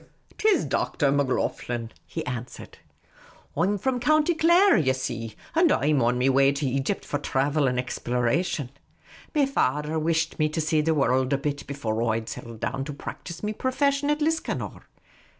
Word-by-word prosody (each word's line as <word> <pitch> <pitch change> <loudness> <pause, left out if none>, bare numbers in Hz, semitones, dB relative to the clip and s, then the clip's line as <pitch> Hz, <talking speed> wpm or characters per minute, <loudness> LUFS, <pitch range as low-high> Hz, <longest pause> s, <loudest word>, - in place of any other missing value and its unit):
" - - -29
'T 435 - +4
is 400 - +3
Dr. 145 -4 0
Macloghlen," 125 -4 -1 0.2
he - - -5
an 125 -1 -3
swered. - - -12 0.4
" - - -26
I 155 - 0
'm 200 +4 +2
from 255 +5 -1
County 310 +6 +3
Clare, 340 +5 +5
ye 130 -5 +3
see; 120 -4 -4 0.2
and 330 -1 +4
I 145 - +2
'm 145 -3 +3
on 120 +1 +2
me 125 +1 +2
way 135 +1 +4
to 140 +1 -2
Egypt 135 +9 -1
for 145 - -2
thravel 140 +1 +1
and 125 - -2
exploration. 125 +3 -1 0.6
Me 290 -2 +4
fader 150 - 0
whisht 160 +1 0
me 155 0 +3
to 155 - -3
see 155 0 +2
the 160 +1 +1
worruld 130 -1 +2
a - - +3
bit 145 0 -4
before 115 -6 -2
I 110 - 0
'd 110 - -10
settle 115 -1 -8
down 135 +4 -3
to 150 - -5
practise 170 +5 -8
me 210 +1 -1
profession 280 +4 0
at 295 +1 +1
Liscannor. 320 +1 -2
145 Hz, 190 wpm, -25 LUFS, 130-205 Hz, 0.6 s, Clare